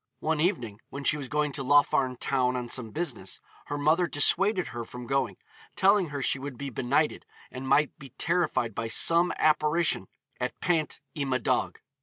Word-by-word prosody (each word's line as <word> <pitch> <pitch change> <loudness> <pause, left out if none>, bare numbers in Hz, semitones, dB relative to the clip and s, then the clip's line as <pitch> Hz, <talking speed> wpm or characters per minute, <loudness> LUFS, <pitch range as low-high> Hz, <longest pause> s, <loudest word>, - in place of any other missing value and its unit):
One 160 -1 0
evening 120 - -1
when 140 0 -7
she 150 - +4
was 140 -3 -6
going 150 0 0
to 135 0 -4
Laugharne 140 -2 +3
town 125 0 0
on 125 -1 -4
some 115 -3 -1
business, 125 - -4 0.3
her 145 - -3
mother 155 +5 +2
dissuaded 185 +6 +3
her 120 0 -5
from 125 +2 -9
going, 135 +2 -1 0.4
telling 195 -1 +4
her 140 -2 -4
she 135 - +2
would 135 -2 -7
be 140 -1 -5
benighted, 135 +5 0 0.3
and 130 +1 -7
might 140 +2 +3
be 140 - -11
terrified 165 -10 0
by 115 +2 -3
some 170 +9 +4
apparition 155 +2 +2 0.3
at 125 0 -3
Pant 160 -6 -1
y 150 - -4
Madog. 130 -1 -1
140 Hz, 175 wpm, -28 LUFS, 125-155 Hz, 0.4 s, she